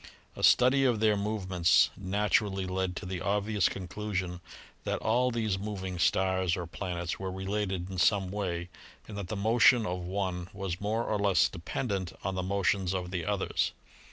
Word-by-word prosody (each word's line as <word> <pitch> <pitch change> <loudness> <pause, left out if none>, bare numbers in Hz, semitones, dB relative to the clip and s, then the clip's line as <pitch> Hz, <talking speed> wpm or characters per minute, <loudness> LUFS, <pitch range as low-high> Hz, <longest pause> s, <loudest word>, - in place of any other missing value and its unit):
A - - -7
study 130 +2 +5
of 120 -5 +2
their 110 -1 +4
movements 95 -4 +2
naturally 100 0 0
led 95 0 -2
to 100 - -6
the 90 -1 -4
obvious 105 -1 +1
conclusion 95 -2 -4 0.4
that - - -1
all 125 +3 +2
these 110 -5 -1
mov 100 -1 -5
ing 90 -2 -4
stars 95 0 +2
or 90 - -3
planets 85 0 -4
were 95 -1 -3
related 95 -1 -2
in 95 -1 -5
some 95 0 +3
way 90 -4 -3 0.4
and 105 - -8
that 100 -3 -5
the 110 - -4
motion 115 +3 +4
of 90 -2 -2
one 90 -1 -3
was 95 -2 -4
more 110 +3 0
or 105 -2 -1
less 95 -4 +4
dependent 95 +1 -3
on 95 - -1
the 95 - -2
motions 95 0 0
of 90 -1 -3
the 90 -3 -2
others. 100 -2 0
95 Hz, 175 wpm, -30 LUFS, 90-105 Hz, 0.4 s, study